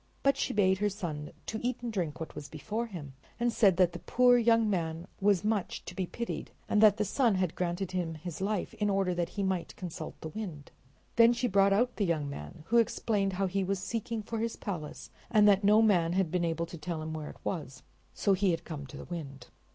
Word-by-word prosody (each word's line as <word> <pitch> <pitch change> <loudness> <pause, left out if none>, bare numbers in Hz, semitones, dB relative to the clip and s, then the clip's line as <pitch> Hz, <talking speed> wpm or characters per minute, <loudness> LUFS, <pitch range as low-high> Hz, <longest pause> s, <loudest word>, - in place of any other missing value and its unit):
But 275 0 +4
she - - -1
bade 190 -2 +3
her 210 0 +2
son 165 -7 -5 0.3
eat 245 0 -2
and 235 -2 -3
drink 170 -7 -2
what 160 - -6
was 145 - -8
before 215 +10 -3
him, 155 -10 -8 0.3
and 240 -1 +1
said 195 -7 +4
that 180 -2 +4
the - - -6
poor 250 0 +4
young 230 -1 +4
man 165 -4 -1
was 200 -1 +3
much 210 -3 -1
to - - -7
be 185 0 -2
pitied, 235 +5 -4 0.2
and 210 - +2
that 215 -1 +7
the 210 - +1
sun 230 +1 +2
had 185 -3 0
granted 180 +1 -2
him 175 -3 -2
his 170 +2 -7
life 205 0 -1
in 210 -1 0
order 195 -2 +1
that 175 -1 -1
he 200 - +1
might 190 -3 -2
consult 165 -3 -7
the 160 - -5
Wind. 160 -6 -7 0.5
Then 230 +1 +7
she 240 +1 0
brought 195 -1 +4
out 240 +5 +2
the 205 - +1
young 160 -5 0
man, 75 - -8
who 235 - +4
explained 205 -3 +1
how 195 +1 0
he 190 +1 0
was 195 +1 0
seeking 225 +3 -3
for 225 +1 -4
his 230 0 -1
palace, 170 -8 -6 0.2
and 210 -3 +5
that 200 0 +5
no 210 +2 +6
man 175 -6 +3
had 185 -3 +1
been 175 -1 +1
able 165 0 -1
to 170 0 -10
tell 155 0 -4
him 155 0 -4
where 155 -1 -5
it - - -11
was, 150 -7 -4 0.3
so 200 - +2
he 195 0 +2
had 165 -1 -1
come 145 -4 -6
to - - -10
the - - -8
Wind. 145 -6 -7
190 Hz, 235 wpm, -30 LUFS, 165-215 Hz, 0.5 s, that